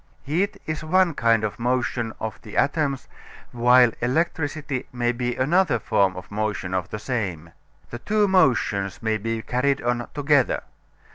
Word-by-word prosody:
Heat 175 +8 -1
is 155 -1 -4
one 180 +2 +3
kind 115 -4 +2
of 105 +1 -3
motion 120 -1 -1
of 110 -3 -5
the 110 - -9
atoms, 140 -4 0 0.4
while 125 0 +5
electricity 145 0 -1
may 120 -1 0
be 120 0 -2
another 150 0 +2
form 100 -3 +1
of 90 +1 -10
motion 105 -3 -2
of 90 -3 -2
the - - -4
same. 95 - -4 0.4
The 120 - -6
two 210 - +1
motions 120 - +1
may 110 -1 +1
be 115 +1 -3
carried 135 +3 0
on 120 0 -1
together. 145 -2 +2
125 Hz, 150 wpm, -24 LUFS, 110-145 Hz, 0.4 s, while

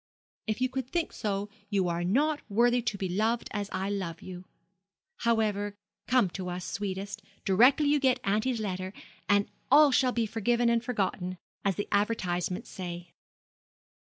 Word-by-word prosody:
If 215 +2 -2
you 255 - +4
could 260 -1 -4
think 340 +1 -1
so, 200 -1 -2 0.2
you 195 -3 +1
are 170 0 -1
not 290 - +2
worthy 240 +4 +3
to 220 -3 -2
be 190 - -2
loved 220 +6 0
as 205 -1 -3
I 190 +2 -2
love 185 -5 -3
you. 180 0 -8 0.7
However, 210 -3 +1 0.3
come 250 -5 +4
to 185 -1 -5
us, 180 0 -4
sweetest, 200 +2 -4 0.2
directly 250 +10 +5
you 295 0 +4
get 260 -2 +3
auntie's 220 +5 +1
letter, 185 -2 -3 0.4
and 205 0 +4 0.2
all 290 +1 +7
shall 255 -1 +3
be 235 -2 0
forgiven 235 +2 +1
and 235 0 +2
forgotten, 190 -6 -2 0.3
as 195 -2 +1
the 205 - -3
advertisements 185 -4 0
say.' 175 -1 -7
205 Hz, 155 wpm, -29 LUFS, 190-240 Hz, 0.7 s, all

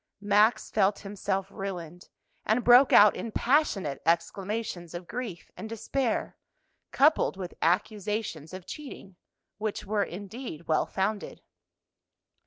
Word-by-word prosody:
Max 210 +2 +3
felt 200 -1 +2
himself 195 -1 -2
ruined, 180 -4 -7 0.3
and 225 +3 +1
broke 245 +3 +7
out 210 0 +7
in 230 - -5
passionate 210 - +1
exclamations 185 0 -2
of 175 0 -7
grief 220 -8 -6
and 220 - -7
despair, 230 +2 -2 0.5
coupled 285 -8 +3
with 180 -2 -6
accusations 195 -2 -1
of 185 -1 -8
cheating, 255 -10 -9 0.4
which 215 -1 -3
were, 210 +1 0
indeed, 200 - -8
well 160 - +2
founded. 200 +2 -3
205 Hz, 115 wpm, -28 LUFS, 180-225 Hz, 0.5 s, broke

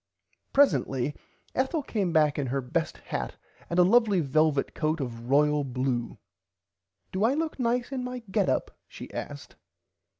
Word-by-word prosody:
Presently 145 - +2 0.4
Ethel 270 +4 0
came 200 -9 -1
back 150 -3 +3
in 140 - -1
her 135 +3 -1
best 160 +6 -2
hat - - -4 0.3
and 170 - -2
a 180 - +7
lovly 210 0 +4
velvit 155 -1 +2
coat 155 +1 0
of 120 -3 -5
royal 150 +1 +4
blue. 125 -2 -2 0.9
Do 190 +2 -1
I 245 +5 +3
look 315 -2 -2
nice 245 +1 0
in 260 -2 -2
my 250 -1 -5
get - - +2
up - - -1
she - - -10
asked. - - -7
160 Hz, 155 wpm, -28 LUFS, -, 0.9 s, a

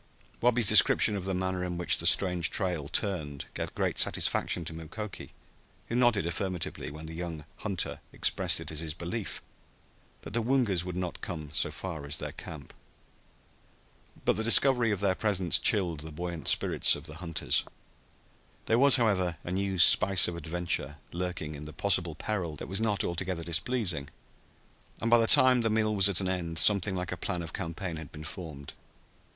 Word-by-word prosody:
Wabi's 120 -1 +3
description 105 - +5
of 95 -2 -4
the 95 -1 -2
manner 95 0 -2
in 90 -1 -4
which 90 - 0
the - - 0
strange 90 -3 +3
trail 90 -7 -2
turned 80 -6 -1
gave - - -5
great - - -1
satisfaction 85 - +1
to 80 - -5
Mukoki, 85 +6 -8 0.6
who 115 - -3
nodded 120 -7 +2
affirmatively 90 0 -3
when 75 +2 -10
the 80 - -8
young 80 -3 -6
hunter 100 -5 -4
expressed - - 0
it - - -6
as 75 - -5
his 80 -2 -5
belief 90 +5 -5 0.8
that - - -9
the 115 - 0
Woongas 115 -7 +1
would 90 -1 -6
not 90 -1 -5
come 80 -4 -6
so - - +2
far 85 -6 -7
as 70 +2 0
their - - -5
camp. 75 -4 -10 1.5
But - - +2
the 110 - -1
discovery 120 +1 +5
of 100 -2 -2
their 100 -2 +2
presence 95 -4 +1
chilled 90 -8 +2
the 80 +2 -9
buoyant 85 0 -6
spirits - - +4
of 75 - -9
the 80 -1 -8
hunters. 85 -2 0 1.0
There 115 +1 +2
was, 140 0 +8
however, 95 -8 +1
a 85 - -6
new 95 0 -2
spice 95 +2 +6
of 90 - -4
adventure 85 -3 -2
lurking 90 -3 -4
in 75 +1 -9
this 75 0 -10
possible 90 -5 +2
peril 85 -4 -3
that - - -8
was 95 +4 -2
not 105 -3 0
altogether 90 0 -3
displeasing, 85 - -2 0.9
and 115 - -2
by 120 - +7
the 115 - +2
time 130 0 +6
the 115 - 0
meal 110 0 +1
was 100 -1 +4
at 100 -1 +3
an 95 - -2
end 85 -3 -3
something 95 +3 +3
like 90 -1 -4
a 90 - -4
plan 90 0 -3
of 85 - -8
campaign 85 +1 -5
had 80 -3 -9
been 75 -1 -10
formed. 80 -4 -8
90 Hz, 180 wpm, -29 LUFS, 80-100 Hz, 1.5 s, was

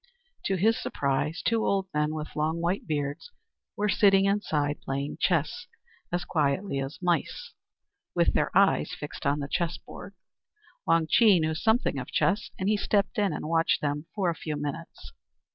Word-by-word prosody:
To 195 - +1
his 220 +5 +2
surprise, 140 +4 -1
two 230 -1 +2
old 195 -1 +1
men, 150 +1 0
with 155 0 -6
long, 155 +2 0
white 175 +4 -1
beards, 145 - -3 0.5
were 210 - +1
sitting 195 -1 +4
inside 155 -8 0
playing 140 +2 -3
chess, 185 - 0 0.4
as 175 0 -1
quietly 155 +1 0
as 135 +2 -4
mice, 180 - -1 0.6
with 170 -1 +3
their - - +1
eyes 195 -2 +3
fixed 150 -1 -5
on 145 +1 +1
the 140 - -3
chessboard. 175 +4 -4 0.7
Wang 165 -1 +4
Chih 205 +2 +5
knew 160 0 0
something 220 - +1
of 125 - -6
chess, 205 +2 0
and 190 - -2
he 210 0 +3
stepped 205 0 0
in 200 -3 +2
and 150 - -4
watched 165 0 +2
them 150 +1 -2
for 185 -4 +1
a - - -5
few 155 -2 -4
minutes. 145 - -6
165 Hz, 165 wpm, -27 LUFS, 150-195 Hz, 0.7 s, Chih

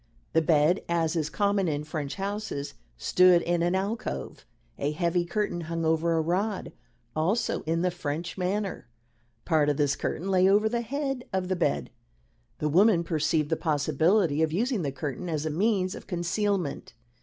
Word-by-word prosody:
The 165 - +4
bed, 160 +3 +3
as 170 -1 +1
is 155 -2 0
common 200 +2 +1
in 150 -2 -1
French 150 -2 -4
houses, 200 -7 -4 0.2
stood 180 - +5
in 175 0 0
an 175 +2 +1
alcove. 205 +4 -4 0.3
A 145 +2 -1
heavy 175 +2 0
curtain 175 -1 -2
hung 165 0 -3
over 160 +1 +2
a 160 - +2
rod, 185 +5 -1 0.4
also 175 +9 0
in 165 +2 +1
the 180 - +2
French 165 0 -4
manner. 195 -1 -2 0.6
Part 155 -2 +3
of 145 - 0
this 145 -2 +2
curtain 190 +4 -3
lay 185 0 +4
over 210 +2 +4
the 235 +1 -1
head 270 +1 -3
of 190 -1 -1
the 185 - +1
bed. 70 - -1 0.7
The 150 - -1
woman 180 +3 +4
perceived 155 -2 0
the 160 - +2
possibility 155 +2 +2
of 160 -1 +2
using 230 - 0
the 140 -4 -2
curtain 145 +5 -5
as 155 -2 -2
a 155 - -1
means 185 +2 +1
of - - -10
concealment. 180 - -2
170 Hz, 170 wpm, -27 LUFS, 155-195 Hz, 0.7 s, stood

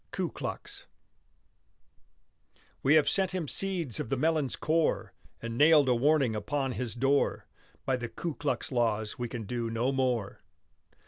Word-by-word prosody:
KU - - -3
KLUX - - -6 2.0
We 140 +3 +4
have 155 - +5
sent 190 -1 +1
him 170 -5 -2
seeds 175 - -1
of - - -4
the 135 - 0
melon's 155 -2 +1
core, 160 +1 0 0.3
And 115 0 -4
nailed 150 -2 +6
a 125 - +4
warning 135 -1 +2
upon 135 +5 -2
his 125 -2 -4
door; 135 +3 +1 0.4
By 130 -1 +1
the 120 -1 -5
Ku 160 +8 -4
Klux 140 -3 -2
laws 110 -3 0
we 120 -1 -3
can 115 -1 -5
do 115 +2 -3
no 115 +4 0
more. 125 -6 -1
130 Hz, 150 wpm, -29 LUFS, 120-150 Hz, 2.0 s, nailed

